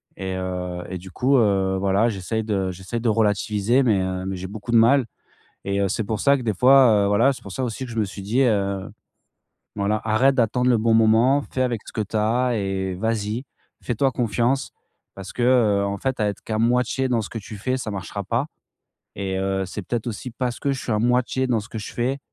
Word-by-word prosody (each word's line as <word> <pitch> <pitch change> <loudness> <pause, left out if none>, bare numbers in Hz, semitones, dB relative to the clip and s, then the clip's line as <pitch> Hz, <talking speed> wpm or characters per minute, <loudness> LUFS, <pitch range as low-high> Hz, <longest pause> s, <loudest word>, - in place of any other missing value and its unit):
Et 95 -1 -4
heu 90 -1 -4
et 95 - -4
du 90 +1 -11
coup, 130 +9 +2
heu, 95 -4 +2
voilà, 100 +3 +2
j'essaye 110 +2 -3
de 95 -3 -1
j'essaye 95 +6 -5
de 120 - +1
relativiser, 105 +3 +2
mais, 110 -6 +3
heu, 95 0 -3
mais 95 0 -3
j'ai 95 +1 -6
beaucoup 105 +4 -7
de 120 - +5
mal 120 +3 +5 0.6
et 100 0 -1
heu, 100 - +1
c'est 110 +3 -2
pour 105 0 -3
ça 140 0 +4
que 130 - -5
des 110 -3 -1
fois, 125 -2 +6
heu, - - +2
voilà, 115 +7 +4
c'est 130 - -11
pour 100 - -9
ça 130 - -2
aussi 125 +2 -4
que 125 - -8
je 115 - -5
me 110 - +2
suis 100 0 -8
dit, 110 +7 0
heu: 100 -5 0 0.9
«Voilà, 105 +1 0
arrête 115 +5 +3
d'attendre 125 0 +1
le 120 - +4
bon 115 +1 +2
moment, 115 +5 +4
fais 130 - -1
avec 120 -3 -1
ce - - -10
que - - -3
tu 105 +2 -5
as 120 +3 +1
et 95 -1 -2
vas-y. 110 +4 -2 0.4
Fais-toi 130 +3 +1
confiance 120 +2 0 0.4
parce 95 -1 -9
que, 125 - -3
heu, 115 -5 +3
en 100 0 -2
fait, 130 +1 -2
à 105 - +2
être 100 - -6
qu'à 110 -1 -3
moitié 125 +3 +1
dans 120 -2 +1
ce 100 - -6
que 115 - -6
tu 105 0 -9
fais, 130 +5 -1
ça 125 -4 -4
marchera 100 +1 -5
pas» 115 +8 -1 0.7
et 95 -1 -3
heu, 95 0 -1
c'est 95 +3 -6
peut-être 115 +4 -3
aussi 120 +2 -5
parce 125 0 -3
que 140 - 0
je 135 - -2
suis - - -4
à 105 - +1
moitié 125 +2 +1
dans 120 -3 +1
ce 105 - -9
que 110 - -5
je 105 - -7
fais, 130 +3 -1
110 Hz, 235 wpm, -23 LUFS, 100-125 Hz, 0.9 s, fois